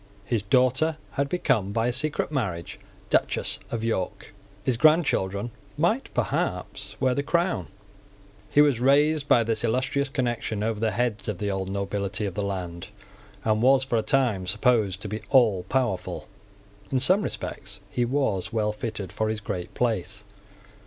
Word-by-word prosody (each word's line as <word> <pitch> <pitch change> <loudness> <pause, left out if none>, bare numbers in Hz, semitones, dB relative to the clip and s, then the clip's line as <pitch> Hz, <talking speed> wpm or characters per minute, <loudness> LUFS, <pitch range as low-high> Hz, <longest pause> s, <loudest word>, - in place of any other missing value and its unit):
His 110 +1 0
daughter 130 +8 +2
had 140 0 -1
become, 130 - +1
by 115 +2 0
a 125 - +1
secret 145 +4 -1
marriage, 95 - -3 0.3
Duchess - - +1
of 115 -1 -3
York. 110 -5 -2 0.3
His 125 - +1
grandchildren 120 - +2 0.3
might 215 - +1
perhaps - - -2
wear 130 -1 +2
the 140 - 0
crown. 170 - 0 0.8
He 145 - +5
was 145 -5 +4
raised 145 +3 +3
by 120 - +5
this 115 -1 -1
illustrious 130 +4 0
connection 120 -5 -2
over 110 -1 -1
the 110 0 +1
heads 110 -4 -1
of 105 -4 -2
the 100 +1 -2
old 95 -1 -2
nobility 100 +1 -2
of 100 - -3
the 105 - -2
land, 90 -4 -4 0.6
and 110 0 +2
was 130 +2 +5
for 130 -2 -2
a - - +1
time 115 -8 +1
supposed 105 -1 +2
to - - -4
be 105 +2 -4
allpowerful. 120 -3 +2 0.6
In 130 - +2
some 185 +10 +4
respects 100 - -5
he 120 - 0
was 120 -8 0
well 105 -2 +1
fitted 105 -3 -5
for 110 +2 -1
his 110 -1 -2
great 100 -4 -5
place. 110 -3 -1
115 Hz, 160 wpm, -26 LUFS, 100-135 Hz, 0.8 s, He